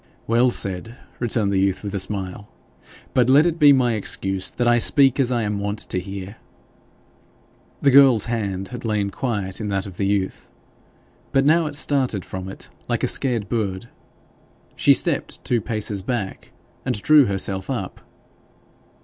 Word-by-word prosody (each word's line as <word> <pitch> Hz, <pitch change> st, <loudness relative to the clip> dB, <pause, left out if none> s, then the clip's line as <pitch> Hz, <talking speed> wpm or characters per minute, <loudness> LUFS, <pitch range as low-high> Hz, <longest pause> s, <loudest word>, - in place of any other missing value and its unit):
'Well 120 Hz, +2 st, +3 dB
said!' 100 Hz, 0 st, -1 dB, 0.2 s
returned 110 Hz, -4 st, +1 dB
the 95 Hz, -, +1 dB
youth 95 Hz, +1 st, 0 dB
with 100 Hz, -, -5 dB
a 100 Hz, -, -2 dB
smile. 100 Hz, 0 st, -3 dB, 0.7 s
'But 125 Hz, -1 st, +2 dB
let 145 Hz, +4 st, +6 dB
it 170 Hz, -1 st, -1 dB
be 145 Hz, -2 st, +7 dB
my 125 Hz, -3 st, +3 dB
excuse 95 Hz, -2 st, -1 dB
that 120 Hz, -, -2 dB
I 120 Hz, 0 st, +4 dB
speak 135 Hz, +2 st, +3 dB
as 130 Hz, -2 st, +1 dB
I 120 Hz, -2 st, 0 dB
am 105 Hz, -1 st, -2 dB
wont 100 Hz, +1 st, -3 dB
to 95 Hz, -, -2 dB
hear.' 95 Hz, +2 st, -8 dB, 1.5 s
The 140 Hz, -, +5 dB
girl's 130 Hz, -4 st, +6 dB
hand 100 Hz, -5 st, -3 dB
had 125 Hz, -, -8 dB
lain 105 Hz, -3 st, -1 dB
quiet 100 Hz, -5 st, -3 dB
in 105 Hz, -, -3 dB
that 100 Hz, -1 st, -2 dB
of 95 Hz, -3 st, -10 dB
the 100 Hz, -, -1 dB
youth, 100 Hz, -2 st, -2 dB, 0.8 s
but 135 Hz, 0 st, +2 dB
now 160 Hz, +2 st, +3 dB
it 150 Hz, -, -6 dB
started 130 Hz, -9 st, 0 dB
from 95 Hz, 0 st, -7 dB
it 95 Hz, -, -10 dB, 0.2 s
like -, -, -2 dB
a -, -, +2 dB
scared 120 Hz, -6 st, +1 dB
bird. 110 Hz, -1 st, -3 dB, 0.9 s
She -, -, +4 dB
stepped -, -, 0 dB
two 120 Hz, -2 st, 0 dB
paces 105 Hz, -2 st, -2 dB
back, 105 Hz, -2 st, -5 dB, 0.3 s
and -, -, -2 dB
drew 150 Hz, +5 st, +5 dB
herself 95 Hz, -2 st, -1 dB
up. -, -, -5 dB
110 Hz, 165 wpm, -21 LUFS, 95-125 Hz, 1.5 s, be